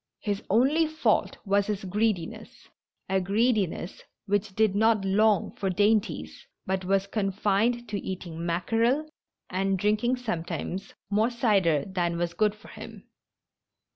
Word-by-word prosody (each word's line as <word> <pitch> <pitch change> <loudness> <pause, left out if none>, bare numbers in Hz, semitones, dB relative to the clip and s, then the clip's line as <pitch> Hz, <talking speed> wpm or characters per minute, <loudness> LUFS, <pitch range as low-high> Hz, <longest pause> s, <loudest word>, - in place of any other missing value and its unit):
His 205 -1 -2
only 275 - +3
fault 315 +1 +1
was 200 0 +2
his 205 -2 -2
greediness 195 -2 -2 0.2
— - - -56
a 190 0 +1
greediness 200 -3 0 0.2
which 205 -1 -1
did 215 -3 +2
not 220 -1 +3
long 205 +1 +2
for 195 - -1
dainties, 205 +3 0 0.2
but 190 0 -1
was 195 +1 +1
con 200 -1 -1
fined 220 +5 +1
to 205 - -2
eating 175 -3 -5
mackerel 225 - +1 0.4
and 195 +1 0
drinking 210 +6 +1
sometimes 190 -4 -4 0.2
more 215 +3 +3
cider 195 - +2
than 175 -3 -1
was 170 0 -1
good 215 +1 +1
for 215 - -16
him. - - -10
200 Hz, 140 wpm, -27 LUFS, 190-220 Hz, 0.4 s, only